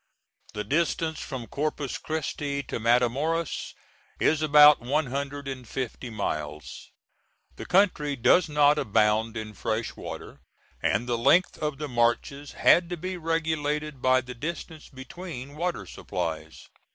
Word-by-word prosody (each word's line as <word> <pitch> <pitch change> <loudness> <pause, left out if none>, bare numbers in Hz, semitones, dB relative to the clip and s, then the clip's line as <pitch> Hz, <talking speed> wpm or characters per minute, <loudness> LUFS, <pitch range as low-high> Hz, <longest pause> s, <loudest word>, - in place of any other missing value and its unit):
The 105 - -2
distance 160 +4 0
from 125 -3 -6
Corpus 145 0 -3
Christi 145 -2 -3
to - - -5
Matamoras 125 +8 0 0.4
is 155 0 +2
about 150 -1 +7
one 140 +6 0
hundred 140 +2 -4
and 130 -3 -6
fifty 125 +1 -5
miles. 75 -8 -5 0.7
The - - -7
country 175 -7 +2
does 155 +7 +4
not 150 0 +4
abound 110 0 +2
in 110 -1 -6
fresh 110 +2 -3
water, - - -8 0.4
and 110 +5 +1
the 120 -1 0
length 175 +10 +3
of 150 -2 -2
the 150 +1 -4
marches 125 +4 0
had 175 -1 +4
to 175 - -3
be 185 +3 -4
regulated 155 -4 -2
by 130 0 +4
the 125 0 -8
distance 160 +4 -6
between 140 0 -9
water 175 +3 -2
supplies. 80 -4 -5
140 Hz, 135 wpm, -27 LUFS, 120-155 Hz, 0.7 s, about